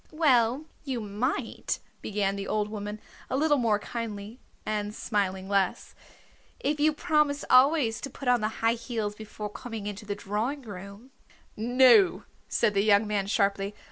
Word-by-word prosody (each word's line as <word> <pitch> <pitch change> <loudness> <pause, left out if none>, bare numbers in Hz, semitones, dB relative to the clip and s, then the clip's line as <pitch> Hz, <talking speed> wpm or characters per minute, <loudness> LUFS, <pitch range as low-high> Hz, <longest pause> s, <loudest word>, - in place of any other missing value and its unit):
"Well, 270 -3 +3 0.2
you 265 -5 -3
might," 215 +6 -2 0.2
began 200 -1 -1
the 200 0 -5
old 210 -1 0
woman, 210 0 -5 0.3
a 260 - 0
little 295 -1 +3
more 225 -4 +2
kindly, 215 +1 -6 0.3
and 210 0 -2
smiling 190 -4 -1
less, 195 -2 0 0.7
"if 295 +2 -1
you 305 +1 +4
promise 300 -2 +1
always 255 -3 +5
to 275 - -5
put 270 0 -8
on 245 -2 +4
the 215 - +1 0.2
high 230 - +5
heels 230 -3 -3
before 210 -1 -7
coming 225 -2 -7
into 205 +1 -6
the 205 - -2
drawing 220 +8 -3
room 200 +4 -10 0.3
" - - -33
"No," 225 -5 +5 0.3
said 215 -3 +2
the 200 - +3
young 205 0 +4
man 205 -2 -1
sharply. 200 -1 0
215 Hz, 160 wpm, -28 LUFS, 205-255 Hz, 0.7 s, always